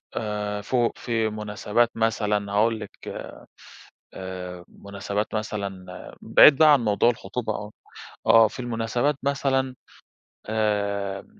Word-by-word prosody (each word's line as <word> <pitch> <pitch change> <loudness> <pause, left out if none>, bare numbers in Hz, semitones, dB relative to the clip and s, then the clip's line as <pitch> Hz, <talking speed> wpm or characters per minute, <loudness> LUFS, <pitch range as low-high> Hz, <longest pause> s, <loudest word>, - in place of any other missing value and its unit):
آآ 105 -1 -3
فوق 120 +2 0
في 115 -2 -1
مناسبات 105 +2 0
مثلًا، 105 -2 0
هاقول 110 +2 +2
لِك - - -8 0.9
آآ، 90 -1 -7
مناسبات 100 +2 -5
مثلًا، 100 -3 -4 0.4
بعيد 145 - +7
بقى 155 -1 +7
عن 140 - +5
موضوع 105 +3 +3
الخطوبة 110 0 -4
آه. 105 0 -6 0.6
آه 115 -1 +7
في - - -9
المناسبات 120 +4 -1
مثلًا 135 -2 0 0.8
آآ، 100 -2 -1
105 Hz, 110 wpm, -24 LUFS, 100-120 Hz, 0.9 s, بعيد